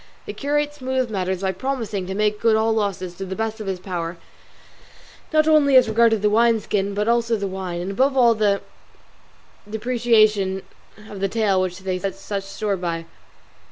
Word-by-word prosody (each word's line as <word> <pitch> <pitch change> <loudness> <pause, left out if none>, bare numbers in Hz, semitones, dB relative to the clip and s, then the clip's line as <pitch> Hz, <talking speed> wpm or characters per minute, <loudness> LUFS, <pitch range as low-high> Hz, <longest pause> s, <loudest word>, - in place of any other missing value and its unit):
The - - -6
curate 295 +1 -1
smoothed 260 -3 -2
matters 190 -2 -2
by 190 -1 0
promising 215 -3 -3
to 190 - -4
make 210 0 0
good 225 -1 +3
all 220 +1 +2
losses 195 -4 -2
to 195 - -5
the 190 0 -5
best 220 +1 -3
of 210 - -6
his 190 -2 -2
power, 175 -2 -4 1.1
not 310 0 +3
only 295 -3 +5
as 255 -2 +7
regarded 225 -1 +3
the 210 - +4
wine 230 +1 +4
skins 200 -1 -2
but 210 +1 -1
also 235 0 +2
the 200 -2 -3
wine, 185 -2 -4
and 185 +2 -4
above 265 +6 +1
all 240 -2 +6
the 205 -2 +1 1.1
depreciation 215 -4 +2 0.4
of 205 - -8
the 195 0 0
tail 205 -4 +1
which 185 -1 -2
they 185 -1 -2
set 195 0 -3
such 195 0 -5
store 200 0 -2
by. 170 -2 -3
210 Hz, 185 wpm, -22 LUFS, 190-230 Hz, 1.1 s, as